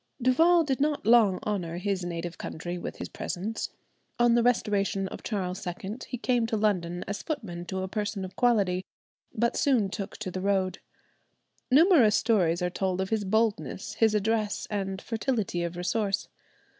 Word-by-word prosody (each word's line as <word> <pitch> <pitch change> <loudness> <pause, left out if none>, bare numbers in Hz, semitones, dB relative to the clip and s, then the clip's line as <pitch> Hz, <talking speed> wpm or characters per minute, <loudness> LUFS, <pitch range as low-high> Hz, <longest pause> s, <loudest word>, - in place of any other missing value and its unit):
Duval 325 +8 +5
did 275 -3 -1
not 295 -6 0
long 220 -5 +5
honour 180 -5 -2
his 190 0 -1
native 175 0 -5
country 175 +2 -5
with 175 - -5
his - - -5
presence. 210 +5 -4 0.5
On 240 0 +4
the 240 - +4
restoration 205 -5 +1
of - - -8
Charles 185 -3 -3
II 190 +5 -5
he 250 - -4
came 240 -1 +1
to 225 - -1
London 180 -5 0
as 200 +1 -3
footman 200 - -5
to 190 +1 -3
a - - -2
person 205 -1 -3
of 185 0 -10
quality, 200 -7 +2 0.5
but 235 +2 0
soon 245 -8 +2
took 200 +1 -5
to 200 -4 -5
the 185 - -4
road. 190 -1 0 0.9
Numerous 275 - +6
stories 180 -6 +2
are 180 - 0
told 185 0 -1
of 190 +2 -2
his 220 -2 +1
boldness, 215 -1 0
his 220 -1 +3
address, 210 0 0
and 195 -2 -2
fertility 220 -5 -2
of 170 0 -3
resource. 195 +3 -1
205 Hz, 170 wpm, -28 LUFS, 185-230 Hz, 0.9 s, Numerous